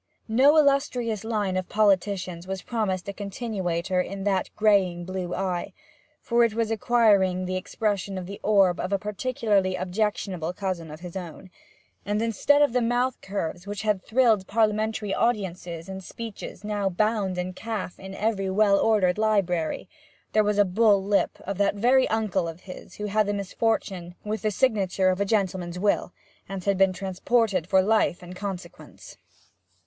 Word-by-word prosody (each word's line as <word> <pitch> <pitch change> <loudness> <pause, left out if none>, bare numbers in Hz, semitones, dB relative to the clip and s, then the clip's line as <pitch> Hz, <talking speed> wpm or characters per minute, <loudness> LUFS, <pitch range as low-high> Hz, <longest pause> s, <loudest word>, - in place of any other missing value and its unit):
No 265 +7 +5
illustrious 275 -7 +2
line 210 -4 -1
of 185 -1 -2
politicians 195 -4 +1
was 190 -1 -4
promised 200 -6 -2
a 200 - -3
continuator 190 -4 -2
in 195 +1 -5
that 195 -2 0
graying 190 -5 +2
blue 185 -1 -4
eye, 185 -2 -2 0.5
for 235 -1 +2
it 230 -2 +1
was 225 -1 0
acquiring 205 -5 +3
the 185 0 -2
expression 200 0 -2
of 185 - -5
the 200 +2 -8
orb 195 -4 +3
of 185 - -3
a 200 - +2
particularly 210 -2 0
objectionable 185 -2 -2
cousin 185 -4 -4
of 155 +2 -10
his 180 0 -9
own; 180 0 -8 0.5
and, 205 +1 -1
instead 230 +6 +3
of 285 - +2
the 250 - +2
mouth 245 +2 0
curves 185 -2 -4
which 205 +1 -4
had 210 -3 +1
thrilled 225 -5 +2
Parliamentary 215 -1 0
audiences 180 -7 -2
in 190 0 -6
speeches 215 -1 -8
now 205 -2 -1
bound 200 -1 0
in 180 +1 -3
calf 215 -3 -5
in 190 0 -8
every 200 -2 -1
well 200 0 +4
ordered 205 -4 +2
library, 190 -7 0 0.4
there 215 - +4
was 210 0 0
the 205 - +5
bull 200 +1 +3
lip 200 0 +1
of 195 0 -5
that 200 0 +2
very 250 +5 +4
uncle 205 -5 0
of 165 +2 -8
his 185 -1 -11
who 210 - -7
had 210 - -3
had 215 +1 +3
the 205 - 0
misfortune 195 -3 -2
with 215 -1 -3
the 215 - +1
signature 200 -5 +1
of 185 +1 0
a - - +2
gentleman's 190 -4 -1
will, 200 -1 +1 0.4
and 195 -2 -5
had 200 +1 +2
been 190 0 +4
transported 190 0 0
for 190 0 +4
life 210 -4 +1
in 180 +1 -9
consequence. 175 - -8
200 Hz, 170 wpm, -25 LUFS, 185-215 Hz, 0.5 s, No